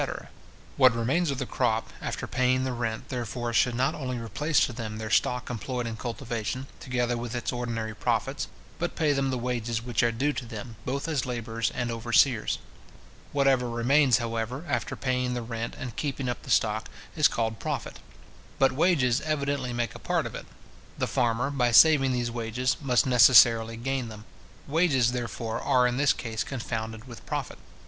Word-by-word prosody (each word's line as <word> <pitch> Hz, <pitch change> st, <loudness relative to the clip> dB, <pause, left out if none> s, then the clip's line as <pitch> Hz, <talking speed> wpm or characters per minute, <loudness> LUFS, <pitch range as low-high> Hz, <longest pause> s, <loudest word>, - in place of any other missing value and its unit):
What 130 Hz, -3 st, +6 dB
remains 135 Hz, +9 st, +1 dB
of 140 Hz, -, -1 dB
the 135 Hz, -, -2 dB
crop, 115 Hz, -3 st, -1 dB
after -, -, -3 dB
paying 130 Hz, 0 st, +1 dB
the 130 Hz, -1 st, -1 dB
rent, 115 Hz, -2 st, -3 dB
therefore, 120 Hz, -1 st, -3 dB
should 120 Hz, +1 st, +3 dB
not 130 Hz, +2 st, +1 dB
only 125 Hz, -3 st, -4 dB
replace 130 Hz, +7 st, 0 dB
to 125 Hz, -, -6 dB
them 110 Hz, -2 st, -5 dB
their 110 Hz, -1 st, -5 dB
stock 125 Hz, +4 st, +1 dB
employed 125 Hz, +1 st, -3 dB
in 115 Hz, -1 st, -4 dB
cultivation, 120 Hz, +1 st, -4 dB
together 120 Hz, -1 st, -1 dB
with 120 Hz, 0 st, -5 dB
its 120 Hz, -, -2 dB
ordinary 115 Hz, -3 st, -3 dB
profits, 120 Hz, +5 st, -1 dB, 0.3 s
but 175 Hz, 0 st, -2 dB
pay 155 Hz, -3 st, +2 dB
them 135 Hz, -1 st, 0 dB
the 130 Hz, -, -1 dB
wages 120 Hz, -2 st, -2 dB
which 120 Hz, -2 st, 0 dB
are 120 Hz, -, +3 dB
due 140 Hz, +6 st, 0 dB
to 130 Hz, -, -5 dB
them, 115 Hz, 0 st, -7 dB
both 140 Hz, +4 st, -2 dB
as 150 Hz, -5 st, -1 dB
labourers 115 Hz, -2 st, -2 dB
and 120 Hz, -1 st, -1 dB
overseers. 115 Hz, +1 st, +2 dB, 0.7 s
Whatever 135 Hz, -3 st, +2 dB
remains, 125 Hz, +2 st, +4 dB
however, 115 Hz, +5 st, -3 dB
after 145 Hz, -, -2 dB
paying 125 Hz, -1 st, -1 dB
the 120 Hz, -, -3 dB
rent 115 Hz, 0 st, -4 dB
and 125 Hz, -4 st, -6 dB
keeping 140 Hz, -3 st, -3 dB
up 120 Hz, -, -3 dB
the -, -, -12 dB
stock, 110 Hz, 0 st, +1 dB, 0.3 s
is 155 Hz, -3 st, +5 dB
called 110 Hz, -2 st, -2 dB
profit. -, -, -4 dB, 0.6 s
But 135 Hz, -1 st, +4 dB
wages 135 Hz, -4 st, +2 dB
evidently 145 Hz, -4 st, -1 dB
make 120 Hz, -1 st, -2 dB
a -, -, -10 dB
part -, -, 0 dB
of -, -, -6 dB
it. -, -, -8 dB, 0.5 s
The -, -, 0 dB
farmer, 120 Hz, +3 st, 0 dB
by 125 Hz, -4 st, +2 dB
saving 135 Hz, +2 st, +6 dB
these 120 Hz, -2 st, -1 dB
wages, 120 Hz, +2 st, -1 dB
must 125 Hz, -4 st, +2 dB
necessarily 115 Hz, -2 st, +6 dB
gain 130 Hz, +1 st, -2 dB
them. 110 Hz, -1 st, -10 dB, 0.4 s
Wages, 140 Hz, -6 st, +3 dB
therefore, 120 Hz, -2 st, -3 dB
are 125 Hz, -3 st, +3 dB
in 125 Hz, 0 st, +1 dB
this 140 Hz, 0 st, +4 dB
case 110 Hz, -2 st, -3 dB
confounded 115 Hz, -2 st, -5 dB
with 120 Hz, -2 st, -10 dB
profit. -, -, -4 dB
125 Hz, 180 wpm, -27 LUFS, 115-135 Hz, 0.7 s, What